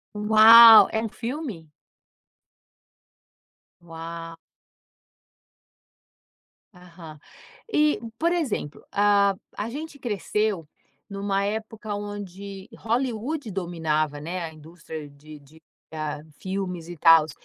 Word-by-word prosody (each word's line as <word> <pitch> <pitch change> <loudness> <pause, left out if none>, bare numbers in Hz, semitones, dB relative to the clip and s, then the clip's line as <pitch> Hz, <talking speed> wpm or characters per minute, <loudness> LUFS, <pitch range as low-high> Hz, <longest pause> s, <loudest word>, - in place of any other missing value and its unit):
Uau! 220 +2 +9
É 220 - -1
um 225 - -4
filme? 230 - -6 2.1
Ua 165 0 -9 2.4
Aham. 170 -4 -14 0.5
E, 300 - +2 0.2
por 335 +6 +1
exemplo, 275 - -3
ah. 200 -1 +3 0.2
A 210 +2 -3
gente 295 +4 -8
cresceu 210 - -2 0.4
numa 200 0 -2
época 220 +1 -5
onde 200 -1 -8
Hollywood 245 +3 -2
dominava, 160 -5 -2
né, 175 +3 -5
a 160 - -9
indústria 155 -1 -10
de 150 +2 -14
de, 150 +3 -21 0.3
hã, 150 -1 -5 0.2
filmes 185 -3 -5
e 175 - -8
tals. 165 -1 +5
195 Hz, 95 wpm, -24 LUFS, 165-220 Hz, 2.4 s, Uau